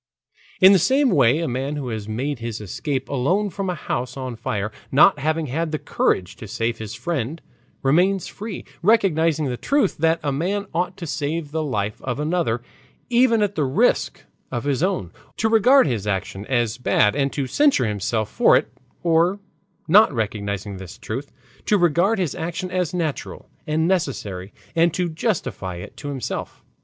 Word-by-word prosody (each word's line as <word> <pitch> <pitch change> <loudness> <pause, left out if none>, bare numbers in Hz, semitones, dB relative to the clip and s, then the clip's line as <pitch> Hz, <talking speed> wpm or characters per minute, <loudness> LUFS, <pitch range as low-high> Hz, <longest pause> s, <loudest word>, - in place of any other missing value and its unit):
In 190 +1 +8
the 190 - +5
same 265 - +3
way 130 -1 +4
a 165 - -1
man 135 +4 -2
who 140 -4 -4
has 110 -2 -4
made 130 +5 -2
his 115 -1 -4
escape 130 - -3
alone 180 +10 0
from 195 0 -3
a 180 - -1
house 125 -4 -4
on 130 -2 -4
fire, 105 -1 -3 0.2
not 150 +4 +6
having 155 +2 0
had 155 +4 -2
the 155 - 0
courage 90 -9 0
to 110 - -9
save 115 +2 -2
his 110 -1 -6
friend, 160 -3 -3 0.4
remains 180 +7 +3
free, 210 -1 -7 0.2
recognizing 165 -7 +3
the 125 -3 -2
truth 275 - +1
that 165 +1 +2
a 145 - 0
man 190 +9 -1
ought 175 +2 -1
to 170 - -6
save 150 0 -3
the 160 +1 -1
life 105 -8 -2
of 130 +1 -3
another 150 -7 0 0.5
even 235 -2 +4
at 205 -1 0
the 155 - 0
risk 130 -1 +1 0.3
of 120 - -2
his 140 -1 0
own, 180 - -1 0.3
to 220 - +2
regard 235 +5 +5
his 110 -7 -2
action 95 0 -3
as 120 -2 0
bad 105 -3 +3
and 140 -1 +1
to 140 - -1
censure 280 - +3
himself 105 +1 -1
for - - +4
it, - - -3 0.3
or, 170 +3 +3 0.5
not 205 +5 +6
recognizing 100 -4 -3
this 95 -2 -9
truth, 130 +6 -6 0.4
to 210 - +4
regard 175 +5 +3
his 180 -7 -1
action 175 +2 -4
as 180 -3 0
natural 165 -5 -4 0.2
and 160 +2 +1
necessary 105 - -2 0.2
and 165 0 +3
to 180 -1 0
justify 135 - -2
it 85 - -9
to 145 - -8
himself. 135 -4 -5
150 Hz, 175 wpm, -22 LUFS, 120-180 Hz, 0.5 s, In